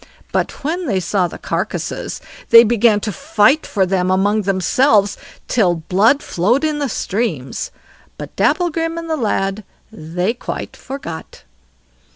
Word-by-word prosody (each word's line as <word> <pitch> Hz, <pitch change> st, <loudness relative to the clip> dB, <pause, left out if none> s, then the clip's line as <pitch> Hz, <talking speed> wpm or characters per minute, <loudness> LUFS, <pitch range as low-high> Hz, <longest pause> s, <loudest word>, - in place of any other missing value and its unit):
But -, -, -2 dB
when 335 Hz, +4 st, -2 dB
they 200 Hz, -6 st, +1 dB
saw 180 Hz, +1 st, 0 dB
the -, -, -9 dB
carcasses, -, -, -4 dB, 0.3 s
they 230 Hz, 0 st, +9 dB
began 225 Hz, -2 st, +3 dB
to 210 Hz, -, -2 dB
fight 275 Hz, -, +2 dB
for 195 Hz, -3 st, +1 dB
them 185 Hz, -1 st, 0 dB
among 200 Hz, +3 st, +2 dB
themselves 200 Hz, +3 st, +2 dB, 0.3 s
till 190 Hz, -8 st, +2 dB
blood 195 Hz, -, +2 dB
flowed 230 Hz, -, +1 dB
in 305 Hz, -1 st, 0 dB
streams; 195 Hz, -, -3 dB, 0.5 s
but -, -, -9 dB
Dapplegrim 330 Hz, -2 st, 0 dB
and 335 Hz, 0 st, -5 dB
the 320 Hz, -, 0 dB
lad 210 Hz, -5 st, -1 dB, 0.3 s
they 180 Hz, +1 st, -2 dB
quite 240 Hz, -, -6 dB
forgot. 170 Hz, -13 st, -8 dB
215 Hz, 135 wpm, -18 LUFS, 185-275 Hz, 0.5 s, they